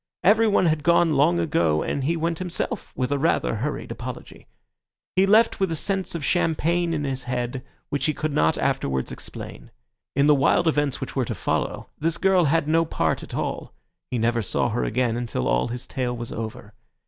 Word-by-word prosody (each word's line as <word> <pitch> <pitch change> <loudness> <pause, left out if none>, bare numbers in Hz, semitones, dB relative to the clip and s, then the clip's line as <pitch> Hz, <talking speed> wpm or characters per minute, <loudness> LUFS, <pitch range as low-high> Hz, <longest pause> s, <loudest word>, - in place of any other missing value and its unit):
Everyone 210 -1 +4
had 155 -2 +2
gone 170 0 +4
long 150 +5 +3
ago, 85 - +1
and 135 - -2
he 165 +3 +1
went 165 0 -1
himself 180 -2 -3
with 130 +1 -1
a 145 - +1
rather 150 -6 +1
hurried 145 +7 -3
apology. - - -8 0.7
He 190 +1 +4
left 220 +3 +4
with 190 -3 +1
a - - 0
sense 190 +2 -2
of 155 -4 -3
champagne 170 0 +1
in 155 -3 -1
his 135 -2 -3
head, 125 +1 -3 0.3
which 145 +1 -1
he 155 - +1
could 155 -1 -2
not 80 - +2
afterwards 65 -1 -1
explain. - - -9 0.5
In 140 - +4
the 150 - +6
wild 145 +5 +3
events 145 -4 +1
which - - -5
were - - +1
to - - -4
follow - - -2
this 165 +2 0
girl 190 -3 +3
had 155 +1 +2
no 165 +2 +3
part 165 - -1
at - - -8
all; - - -4 0.3
he 125 - -2
never 115 +1 +1
saw 100 - 0
her - - -1
again 115 - 0
until 120 - -2
all - - +2
his 120 +1 -5
tale 125 -2 -3
was 120 0 -6
over. 110 0 -6
145 Hz, 195 wpm, -24 LUFS, 125-170 Hz, 0.7 s, the